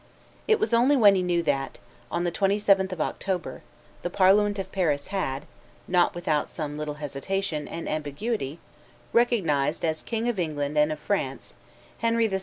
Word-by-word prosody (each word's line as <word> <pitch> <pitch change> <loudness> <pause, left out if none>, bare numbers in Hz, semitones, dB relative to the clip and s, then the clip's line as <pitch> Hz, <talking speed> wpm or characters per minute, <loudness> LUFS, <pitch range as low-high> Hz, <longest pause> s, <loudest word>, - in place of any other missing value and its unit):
It 440 -1 +4
was 430 - 0
only 250 +5 +5
when 205 -5 +7
he 190 - +1
knew 175 -1 +1
that, 135 -3 -1 0.3
on 170 - -1
the 175 - 0
27th 195 0 +2
of 185 - -5
October, 185 +1 -3 0.4
the 175 - -2
parliament 205 +3 +4
of 190 -1 -5
Paris 150 -7 0
had, 145 -8 -2 0.4
not 175 -1 +3
without 155 -4 0
some 150 -3 -5
little 150 0 -4
hesitation 150 +3 -3
and 165 - -6
ambiguity, 155 - -3 0.6
recognized 170 - +2
"as 155 -1 -1
King 230 0 -2
of 235 -5 -1
England 150 -3 -2
and 150 +1 +3
of 155 - -3
France, 140 -7 -3 0.5
Henry 230 0 +2
VI. 195 -3 0
175 Hz, 165 wpm, -26 LUFS, 150-205 Hz, 0.6 s, when